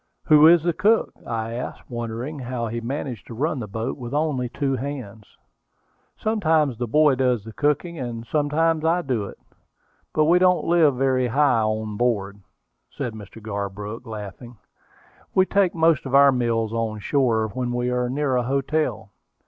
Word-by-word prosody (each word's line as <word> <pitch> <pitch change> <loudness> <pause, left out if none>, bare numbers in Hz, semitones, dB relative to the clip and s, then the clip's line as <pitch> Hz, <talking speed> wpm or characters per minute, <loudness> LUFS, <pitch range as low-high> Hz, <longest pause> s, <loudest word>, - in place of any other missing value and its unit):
"Who 155 0 +7
is 170 -1 +6
the 175 0 +1
cook?" 210 +7 +2
I 115 -1 -3
asked, 125 +2 -6
wondering 120 +5 -5
how 125 -2 -3
he 115 +1 -4
managed 125 -2 -5
to 115 - -8
run 145 +3 -1
the 110 - -5
boat 110 +3 -4
with 120 +2 -5
only 145 -5 0
two 135 +2 -1
hands. 125 -6 -7 0.8
"Sometimes 160 - +1
the 120 - -2
boy 150 +4 +4
does 125 -4 +1
the 110 0 -10
cooking, 150 +5 -1
and 120 -2 -5
sometimes 155 +3 +1
I 170 +2 +2
do 125 -7 -1
it; - - -10 0.7
but 155 - +2
we 175 +3 +5
don't 180 -1 +3
live 165 -5 +4
very 130 -1 +1
high 130 -2 +3
on 110 -1 -2
board," 105 -4 -1 0.5
said 120 - -5
Mr. 110 +1 -11
Garbrook, 105 +2 -5
laughing. 110 +2 -8 0.8
"We 190 - +5
take 195 -2 +1
most 160 -4 +2
of 135 - 0
our 140 0 +7
meals 115 -3 0
on 115 -2 -2
shore 110 -2 +1
when 125 +3 -3
we 125 0 -1
are 125 0 0
near 135 -1 0
a - - +2
hotel." 130 -4 -1
125 Hz, 170 wpm, -23 LUFS, 115-150 Hz, 0.8 s, Who